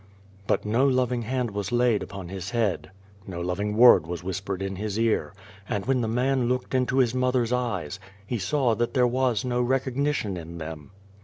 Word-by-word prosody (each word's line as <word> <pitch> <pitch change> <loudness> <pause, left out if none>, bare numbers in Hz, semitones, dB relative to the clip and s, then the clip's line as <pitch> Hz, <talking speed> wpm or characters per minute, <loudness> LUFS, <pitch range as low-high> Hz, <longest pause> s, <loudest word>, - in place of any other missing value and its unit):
" 95 0 -26
But - - +1
no 120 +6 +3
loving 125 -2 +1
hand 125 0 -2
was 100 0 -4
laid 120 -3 +3
upon 95 -3 -7
his 95 0 -5
head, 105 -8 -1 0.4
no 90 -3 -5
loving 100 +4 -2
word 120 -9 +7
was 85 0 -5
whispered 95 +1 -3
in 95 -1 -4
his 105 0 -3
ear, 115 -1 +1 0.4
and 100 - -2
when 130 -1 +1
the 115 - -1
man 125 +2 +1
looked 125 +1 -2
into 130 0 +1
his 125 -3 +3
mother's 125 -2 +1
eyes, 95 -9 -2 0.3
he 115 +3 -3
saw 125 - +1
that 120 +4 -2
there 125 -1 +4
was 125 -1 +1
no 125 -1 0
recognition 130 -4 0
in 85 0 -8
them. 80 -2 -7
115 Hz, 190 wpm, -26 LUFS, 95-125 Hz, 0.4 s, word